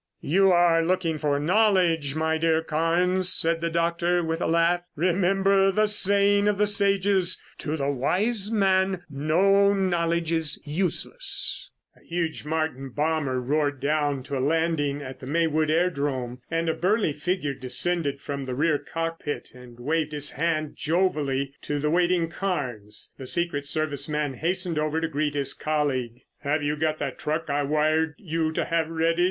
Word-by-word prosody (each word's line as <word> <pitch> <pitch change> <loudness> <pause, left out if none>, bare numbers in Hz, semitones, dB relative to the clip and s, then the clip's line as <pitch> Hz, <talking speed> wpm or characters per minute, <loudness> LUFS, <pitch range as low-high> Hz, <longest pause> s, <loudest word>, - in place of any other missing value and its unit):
"You 190 +5 +3
are 175 -2 +4
looking 165 -2 0
for 145 -2 0
knowledge, 175 -4 +2
my 160 0 0
dear 160 0 +2
Carnes," 175 +4 +1
said 165 0 +2
the 170 - -1
doctor 170 +1 0
with 165 +1 -2
a - - 0
laugh. 170 +1 +2
"Remember 195 +3 +2
the 215 +2 +2
saying 200 0 +3
of 210 -1 +1
the 210 - +3
sages: 200 -2 +2 0.2
To 155 0 -3
the 140 -1 -1
wise 200 - +1
man, 190 -3 +1
no 195 +8 +3
knowledge 170 -3 0
is 160 -2 0
useless." 185 - +1 0.3
A - - -24
huge 165 -3 -3
Martin 155 -4 -2
bomber 145 -2 -1
roared 145 +2 -1
down 145 -1 0
to 140 +1 -5
a - - -1
landing 145 -1 0
at 130 -1 -9
the 130 - -9
Maywood 155 0 +1
airdrome, 140 -7 -1
and 165 0 -1
a 160 - +2
burly 195 -2 +1
figure 150 -1 -2
descended 140 +3 -1
from 140 -1 -5
the 130 -1 -4
rear 150 +1 +1
cockpit 165 -2 -5
and 125 -1 -14
waved 155 +3 -1
his 150 0 -1
hand 155 0 -1
jovially 145 -6 0
to 145 - -3
the 150 +1 -1
waiting 175 0 +2
Carnes. 125 - -4
The 130 - -7
secret 170 -3 -1
service 145 -1 -1
man 150 -2 -1
hastened 175 +2 -1
over 155 +1 0
to 165 - -1
greet 150 -1 -2
his 140 -2 0
colleague. 135 -6 -2 0.2
"Have 145 +1 -1
you 145 +1 0
got 155 0 -1
that 140 -3 -5
truck 155 0 -2
I 145 +1 +1
wired 155 +2 +1
you 160 -3 -2
to - - -1
have 165 -1 0
ready?" 165 +1 0
160 Hz, 165 wpm, -25 LUFS, 145-175 Hz, 0.3 s, are